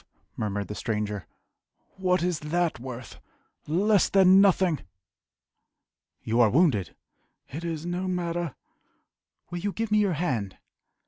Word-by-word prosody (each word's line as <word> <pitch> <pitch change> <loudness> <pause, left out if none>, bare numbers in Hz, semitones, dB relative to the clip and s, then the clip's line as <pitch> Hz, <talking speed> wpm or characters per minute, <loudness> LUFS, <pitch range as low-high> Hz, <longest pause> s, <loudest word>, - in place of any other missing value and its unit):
murmured 100 -2 -3
the 105 - -5
stranger 105 -2 -3 0.7
"What 180 -1 +1
is 175 -3 0
that 165 -2 -1
worth? 125 -2 -8 0.5
Less 195 +5 +3
than 190 0 +6
nothing!" 185 -5 +3 1.4
"You 115 +2 +2
are 115 - +6
wounded!" 125 - +2 0.5
"It 155 +5 -6
is 165 -1 -4
no 175 +2 -2
matter." 175 -3 -2 1.0
"Will 175 - -3
you 205 +3 -2
give 225 +1 -3
me 210 - +4
your 200 -3 +2
hand?" 125 - -2
170 Hz, 125 wpm, -27 LUFS, 120-185 Hz, 1.4 s, than